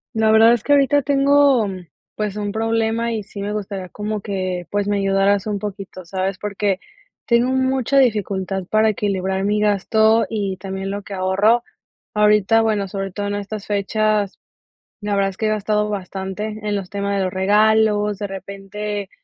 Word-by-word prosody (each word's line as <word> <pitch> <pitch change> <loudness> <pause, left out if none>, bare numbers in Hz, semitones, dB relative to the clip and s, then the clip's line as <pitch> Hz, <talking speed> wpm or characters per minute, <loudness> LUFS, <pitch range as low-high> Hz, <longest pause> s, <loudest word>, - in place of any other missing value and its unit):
La 220 0 +3
verdad 220 +1 +7
es 240 - +2
que 290 - +2
ahorita 285 0 +4
tengo 280 -4 +4
mm, 185 -2 -7 0.3
pues, 210 -2 -3
un 205 -1 -3
problema 225 +1 0
y 215 -2 -3
sí 200 0 -9
me 205 +1 -3
gustaría 195 -3 -5
como 210 +3 -4
que, 185 -3 -3
pues, 205 0 -1
me 205 - +1
ayudaras 195 +1 +2
un 210 -1 -1
poquito, 195 -2 -7
¿sabes?, 190 +2 -2
porque 205 -1 -2 0.4
tengo 235 +1 +3
mucha 260 0 +1
dificultad 195 -6 +1
para 215 0 +3
equilibrar 190 -2 -1
mi 210 +1 +1
gasto 220 +2 +3
y 200 -4 -2
también 195 +1 -5
lo 200 +1 -4
que 200 - -9
ahorro. 195 +5 +2 0.5
Ahorita, 210 +1 +4
bueno, 210 -3 0
sobre 195 0 -4
todo 205 +1 -3
en 205 - -2
estas 205 0 -6
fechas, 210 0 0 0.6
la 205 -1 -2
verdad 195 0 +2
es 190 - -11
que 220 - -2
he - - +2
gastado 210 0 0
bastante 200 +1 -5
en 210 -1 -1
los 195 -2 -4
temas 200 0 -2
de 195 - +1
los 185 - -1
regalos, 210 +1 +3
de 205 - -3
repente, 200 +1 -6
205 Hz, 180 wpm, -20 LUFS, 195-220 Hz, 0.6 s, verdad